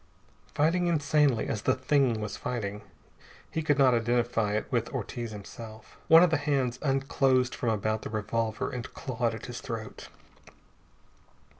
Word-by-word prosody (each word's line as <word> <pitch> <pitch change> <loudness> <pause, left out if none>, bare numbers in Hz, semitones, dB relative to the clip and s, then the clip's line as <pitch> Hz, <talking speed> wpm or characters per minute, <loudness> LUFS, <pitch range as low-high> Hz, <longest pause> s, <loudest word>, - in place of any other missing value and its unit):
Fighting 170 +4 +2
insanely 150 -6 +2
as 105 - -2
the 130 - +2
Thing 130 -3 +2
was 105 -1 -4
fighting, 105 -5 -4 0.7
he 160 - -1
could 150 -2 +1
not 135 -3 +5
identify 120 -2 +1
it 105 - -1
with - - 0
Ortiz 120 -1 -4
himself. 110 +1 -10
One 165 +2 +8
of 180 - +3
the 160 - +3
hands 135 -4 0
unclosed 135 -2 +2
from 120 - -2
about 110 0 0
the - - -6
revolver 110 +1 -2
and 125 -2 -6
clawed 120 -3 -2
at 110 - -8
his 120 0 -7
throat. 115 -3 -7
120 Hz, 150 wpm, -28 LUFS, 110-140 Hz, 0.7 s, One